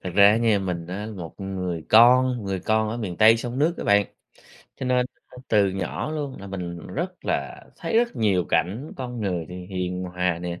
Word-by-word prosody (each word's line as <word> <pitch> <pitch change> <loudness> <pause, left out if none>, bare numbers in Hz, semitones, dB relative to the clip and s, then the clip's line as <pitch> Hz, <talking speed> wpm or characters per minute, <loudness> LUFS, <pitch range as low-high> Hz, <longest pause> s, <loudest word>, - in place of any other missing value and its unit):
Thật 90 - -4
ra 100 0 +8
á 110 - +3
nha 115 -3 +3
mình 90 -3 -3
á 100 +4 -5
một 85 -3 -8
người 90 -4 -4
con, 125 +1 +6
người 95 -1 -2
con 110 +2 +1
ở 115 - -3
miền 100 -7 -4
Tây 110 +3 +7
sông 120 +2 -4
nước 160 +4 +2
á - - -4
bạn, 100 -1 +4 0.7
cho 130 - -4
nên 125 0 +2 0.2
á, - - -15
từ 105 -2 +4
nhỏ 95 +9 -3
luôn 145 -4 -4
là 100 - -8
mình 90 -3 -6
rất 180 +4 -5
là - - -2
thấy 225 - 0
rất 240 0 0
nhiều 95 -5 +2
cảnh 95 - -1
con 125 -3 -5
người 90 -5 -2
thì 90 0 -8
hiền 90 -1 -3
hòa 90 -1 -1
nè, 85 0 -5
100 Hz, 215 wpm, -24 LUFS, 90-120 Hz, 0.7 s, ra